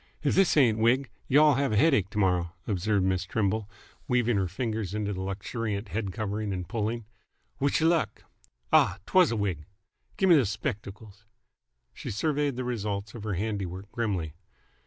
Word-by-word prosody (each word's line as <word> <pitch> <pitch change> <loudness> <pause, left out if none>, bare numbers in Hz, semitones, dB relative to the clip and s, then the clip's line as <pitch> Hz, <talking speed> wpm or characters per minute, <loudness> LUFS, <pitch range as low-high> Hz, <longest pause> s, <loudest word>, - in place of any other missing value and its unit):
"If 145 - +2
this 190 -4 +3
ain't 115 -6 +4
a - - -2
wig, 125 +4 +2 0.2
y'll 150 +2 +6
have 140 0 0
a - - +2
headache 120 - +3
t'morrow," 90 -4 +1
observed 100 0 0
Miss 95 -1 +1
Trimble, 105 0 -1 0.4
weaving 120 -2 +2
her 95 -1 +1
fingers 105 0 -3
into 105 -1 -2
his 100 - -3
luxuriant 100 +2 -3
head 100 +2 -2
covering 105 0 -3
and 90 -2 -4
pulling. 110 +3 -2 0.5
"Wish 140 +3 +1
y' - - +3
luck! 165 -1 +1 0.5
Ah! - - +5
'twas 185 -3 +5
a - - 0
wig. 95 -8 -2 0.5
Gimme 190 -2 +5
those 135 -10 +4
spect'cles." 105 -3 -6 0.7
She - - -7
surveyed 145 +5 0
the 130 - -3
results 105 -4 -3
of 115 - -8
her 105 -3 -1
handiwork 100 -1 -4
grimly. 95 -10 -2
105 Hz, 165 wpm, -28 LUFS, 100-125 Hz, 0.7 s, y'll